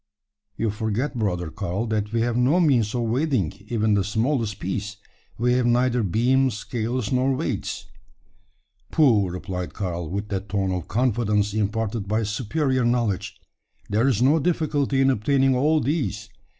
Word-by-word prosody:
"You 115 -2 0
forget, 110 +6 -2
brother 90 -8 -2
Karl, 95 +9 -3
that 110 -2 -2
we 115 0 0
have 120 0 0
no 130 +8 +3
means 125 - +2
of 120 - 0
weighing, 120 - 0
even 110 -2 +1
the 100 -1 +2
smallest 110 0 -1
piece. 100 +3 -4 0.4
We 125 +2 +2
have 125 -1 +2
neither 125 0 +2
beam, 125 +7 +2
scales, 115 +1 -3
nor 130 +1 +2
weights." 130 - -3 1.0
"Pooh!" 115 - +3
replied 90 0 -5
Karl, 85 -4 -3
with 100 +3 -4
that 95 -1 -4
tone 95 -1 0
of 90 -2 -3
confidence 105 -4 +1
imparted 110 0 -1
by 110 +3 0
superior 130 +5 0
knowledge. 110 -5 -1 0.5
"There's 115 +2 +2
no 145 +5 +4
difficulty 145 -4 0
in 135 0 +4
obtaining 135 +3 +2
all 150 +5 +3
these. 130 -8 -2
115 Hz, 150 wpm, -24 LUFS, 105-130 Hz, 1.0 s, no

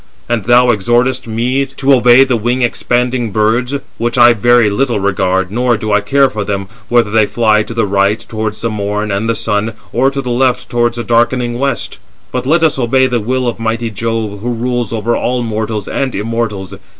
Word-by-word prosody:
And 115 -5 -1
thou 120 +1 +5
exhortest 120 +4 +1
me 120 +5 0
to 135 +1 +1
obey 125 0 +6
the 130 -2 0
wing 120 +3 -1
expanding 120 0 0
birds; 110 +6 0 0.2
which 120 +1 -1
I 120 0 +7
very 120 +1 +3
little 120 +2 0
regard, 95 -1 0
nor 120 +1 +1
do 110 0 -4
I 105 - +3
care 135 +6 +3
for 105 -5 -4
them, 100 -1 -3 0.2
whether 120 -3 +2
they 110 -1 +3
fly 110 -2 +2
to 110 - -6
the 115 - +1
right 100 +1 +1
towards 110 -1 -5
the 115 - -1
Morn 105 0 -2
and 100 +4 -1
the 115 - +1
Sun, 110 0 -1 0.2
or 130 +3 +3
to 140 0 -5
the 125 - -3
left 125 +1 0
towards 120 0 0
the 120 - -3
darkening 120 +1 0
west; 140 0 -2 0.3
but - - -3
let 165 +3 +3
us 155 -4 +2
obey 130 +2 +2
the 125 -2 0
will 125 +3 -1
of 120 - -3
mighty 115 0 -2
Jove, 110 -1 -3
who 120 +3 -3
rules 120 -1 -2
over 115 +1 -1
all 125 0 -1
mortals 110 -2 -3
and 135 -2 -2
immortals. 105 -3 -3
115 Hz, 200 wpm, -14 LUFS, 105-125 Hz, 0.3 s, I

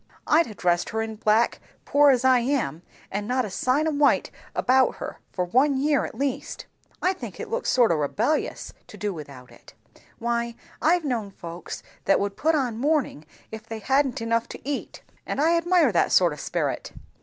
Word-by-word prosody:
I'd 325 +1 +4
ha' 215 - -9
dressed 175 -1 +1
her 220 0 -1
in 220 0 -5
black, 215 +2 +2 0.3
poor 290 0 +5
as 260 -1 +3
I 260 -1 +6
am, 240 - -1 0.3
and 205 +1 -3
not 255 0 +1
a 205 - -7
sign 260 +10 +1
o - - +1
white 290 -1 +2 0.2
about 260 0 +3
her, - - -7
for 180 - -1
one 265 +9 +3
year 285 +1 +2
at - - -8
least. 275 -2 -3 0.4
I 370 - +3
think 375 - -9
it 450 -1 -6
looks 480 +2 -1
sort 240 -5 +4
o' - - +3
rebellious, 215 - -1
to - - -12
do 205 -1 -2
without 140 -6 -10
it. - - -17 0.4
Why 235 0 -2 0.3
I've 335 +1 +3
known 235 -7 -2
folks 170 -2 -8 0.2
that - - +4
would 200 0 -2
put 320 +7 +2
on 245 -6 -1
mourning 280 - 0 0.3
if 220 0 -8
they 225 - -5
hadn't 265 +3 +1
enough 230 0 0
to - - -10
eat; 285 -1 -4 0.2
and - - -3
I 325 +3 +4
admire 340 -5 +3
that 175 - +2
sort 175 -4 +4
o' - - -6
sperit." 150 - -3
245 Hz, 195 wpm, -25 LUFS, 205-290 Hz, 0.4 s, I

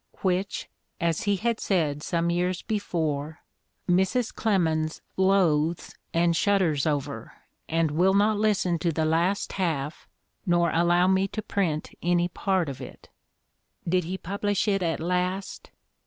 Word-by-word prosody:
— - - -27
which, 190 +1 -1 0.3
as 170 0 0
he 205 -1 +2
had 230 +3 -1
said 155 -7 0
some 170 +1 0
years 180 +1 -1
before, 160 -8 -2 0.5
"Mrs. 190 +7 +1
Clemens 160 -7 0 0.2
loathes, 175 -4 +2 0.2
and 170 0 +2
shudders 170 -7 +2
over, 145 -3 -3 0.4
and 165 -1 +1
will 185 +5 +3
not 210 +1 +3
listen 195 -5 +1
to 170 +1 0
the 160 0 0
last 170 +5 +1
half 160 -6 -2 0.4
nor 175 -1 +2
allow 175 +2 +3
me 190 +1 +3
to 215 +2 -5
print 175 -7 -1
any 175 0 +2
part 185 -1 0
of 135 -2 -6
it." - - -11 0.8
Did 180 0 +1
he 185 +3 -3
publish 200 +3 -1
it 195 -2 +2
at 165 -2 -1
last? 180 +3 -2
175 Hz, 140 wpm, -26 LUFS, 160-195 Hz, 0.8 s, will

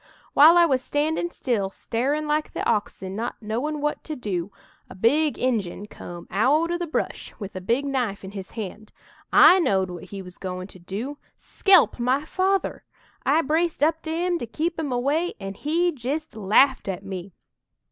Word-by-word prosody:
"While 320 +4 +8
I 345 - +7
was 265 -6 +1
standin' 310 +5 -1
still, 230 - -1
starin' 275 +9 -2
like 300 +1 -1
the - - -2
oxen, 205 -3 -1
not 230 +3 -4
knowin' 250 +8 -3
what 295 0 -1
to 310 - -4
do, 200 -7 -3 0.4
a - - -10
big 285 +10 +2
Injun 215 -6 -1
come 175 -4 -10
out 290 - +2
o' 345 - 0
the 345 - -3
brush, 315 - -3
with 200 -3 -8
a 185 - -4
big 235 +9 0
knife 245 -8 -2
in 190 - -7
his 195 -2 -7
hand. 215 0 -6 0.4
I 375 - +8
knowed 190 - +1
what 175 0 -8
he 195 +1 -8
was 180 -1 -13
goin' 185 -1 -5
to 185 - -14
do 220 +11 -5 0.2
skelp 375 -10 +4
my 260 +5 +1
father! 380 +4 0 0.4
I 305 +4 +4
braced 320 +2 0
up 320 +1 +2
to 320 - -5
'im 345 +1 0
to 235 - -5
keep 325 +8 -2
'im 295 -4 -2
away, 285 +8 0
an' 195 0 -5
he 330 - 0
jist 295 +3 -4
laffed 220 +6 +3
at 195 0 -4
me. 190 -1 -7
255 Hz, 185 wpm, -24 LUFS, 200-310 Hz, 0.4 s, While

